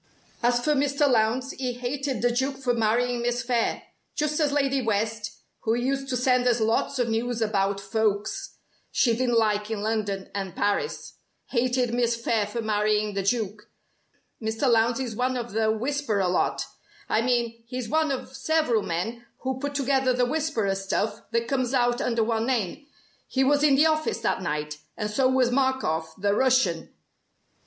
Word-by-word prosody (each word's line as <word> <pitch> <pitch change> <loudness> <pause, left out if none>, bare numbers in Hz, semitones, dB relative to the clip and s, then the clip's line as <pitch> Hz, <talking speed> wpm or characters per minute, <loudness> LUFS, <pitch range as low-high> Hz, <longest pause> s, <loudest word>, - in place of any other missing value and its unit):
"As 240 0 +2
for 300 - +3
Mr. 285 +1 +2
Lowndes, 250 +2 +2
he 255 -1 -3
hated 255 0 -3
the 245 - +4
Duke 265 +3 -1
for 255 -2 0
marrying 235 +2 +1
Miss 240 +1 -1
Phayre 240 -2 0 0.3
just 300 +1 0
as 295 -2 +2
Lady 275 -2 +1
West 220 -1 -2 0.2
(who 225 0 0
used 270 +3 -1
to 250 - 0
send 250 0 +2
us 240 -1 +3
lots 225 +5 +1
of 245 -2 +1
news 230 +1 -1
about 200 -3 +1
folks 215 - -1 0.4
she 235 -3 +3
didn't 240 -1 +1
like 210 -1 +1
in 215 -2 -3
London 210 -3 -2
and 195 -3 -4
Paris) 205 - -2 0.3
hated 250 -1 +1
Miss 240 -1 +2
Phayre 230 -2 0
for 230 +2 -4
marrying 210 0 +1
the 195 - -1
Duke. 210 0 -2 0.7
Mr. 220 +5 -1
Lowndes 230 +1 +3
is 245 -4 -3
one 255 +2 0
of 240 -1 -5
the 220 +1 +1
'Whisperer' 220 -4 0
lot. 180 - 0 0.4
I 220 - +2
mean 235 -1 0
he's 250 -1 -4
one 315 0 +1
of 265 -1 -4
several 270 -5 +1
men 205 +8 -3 0.2
who 260 0 -2
put 285 +1 -4
together 270 -2 +2
the 250 0 +2
'Whisperer' 250 -8 0
stuff 195 +2 -2
that 230 0 0
comes 260 -1 0
out 240 -1 +2
under 230 -2 +1
one 225 +1 0
name. 255 - -1 0.4
He 265 - +1
was 290 +2 +3
in 295 -2 +5
the 295 +3 +5
office 310 -5 +1
that 225 - 0
night, 150 -3 -3 0.2
and 210 -1 -2
so 255 +4 +3
was 260 -2 +3
Markoff 245 - 0
the 200 +1 +2
Russian! 230 -9 +2
240 Hz, 175 wpm, -26 LUFS, 215-260 Hz, 0.7 s, in